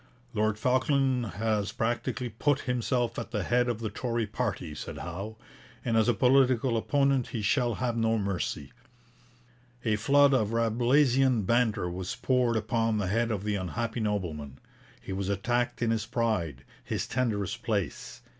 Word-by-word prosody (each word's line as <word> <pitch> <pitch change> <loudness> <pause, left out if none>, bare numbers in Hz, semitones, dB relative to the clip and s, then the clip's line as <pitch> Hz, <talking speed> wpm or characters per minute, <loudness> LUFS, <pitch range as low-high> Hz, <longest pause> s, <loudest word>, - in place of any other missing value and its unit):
Lord 110 -1 +1
Falkland 130 0 +2
has 105 -1 0
practically 120 +2 -2
put 140 +6 0
himself 120 -1 -1
at - - -6
the 105 -4 -2
head 120 +4 +2
of 115 -2 -2
the 110 -2 -3
Tory 115 +1 -1
party, 105 -7 -3
said 75 - -7
Howe, 100 +6 -6 0.5
and 115 -2 +1
as 110 +1 +4
a 120 - +3
political 130 +1 +3
opponent 140 +2 +2
he 110 -3 -4
shall 120 +1 +2
have 125 -2 -1
no 115 -1 +2
mercy. 100 -3 -3 1.1
A 110 -2 +2
flood 140 +5 +5
of 110 -4 +1
Rabelaisian 120 +2 +3
banter 115 -4 +2
was 90 +1 -4
poured 125 -3 +1
upon 115 0 0
the 100 -3 -1
head 115 +3 +1
of 105 -4 -2
the 105 0 -1
unhappy 110 +5 -3
nobleman. 85 - -3 0.4
He 95 - -6
was 95 0 -2
attacked 120 +5 0
in 115 - +2
his 110 -2 -1
pride, 95 - -1 0.2
his - - -2
tenderest 110 -7 -1
place. - - -3
115 Hz, 155 wpm, -28 LUFS, 105-125 Hz, 1.1 s, flood